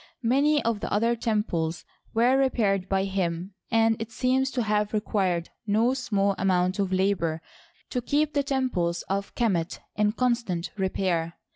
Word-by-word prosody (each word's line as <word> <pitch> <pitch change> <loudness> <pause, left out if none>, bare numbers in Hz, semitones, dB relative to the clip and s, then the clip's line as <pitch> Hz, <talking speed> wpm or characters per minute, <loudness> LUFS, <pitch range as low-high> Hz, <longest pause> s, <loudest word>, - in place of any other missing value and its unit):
Many 285 +5 +3
of 230 -2 +1
the - - -5
other 230 +3 +2
temples 195 -8 -1 0.3
nvere 240 +3 +4
repaired 200 -8 +1
by 195 0 +2
him, 185 -1 -2 0.2
and 225 -1 +2
it 225 0 -5
seems 260 +3 +1
to 250 -2 -1
have 210 -1 0
required 190 -5 0 0.2
no 225 +5 +3
small 200 -6 +1
amount 185 0 +1
of 195 -2 0
labor 185 -4 +1 0.5
to 250 - -1
keep 295 +4 +1
the 285 - +2
temples 255 - -1
of 200 +1 -3
Qimet 185 -8 0 0.2
in 210 0 +2
constant 235 -8 -1
repair. 185 -4 -1
210 Hz, 150 wpm, -26 LUFS, 185-240 Hz, 0.5 s, nvere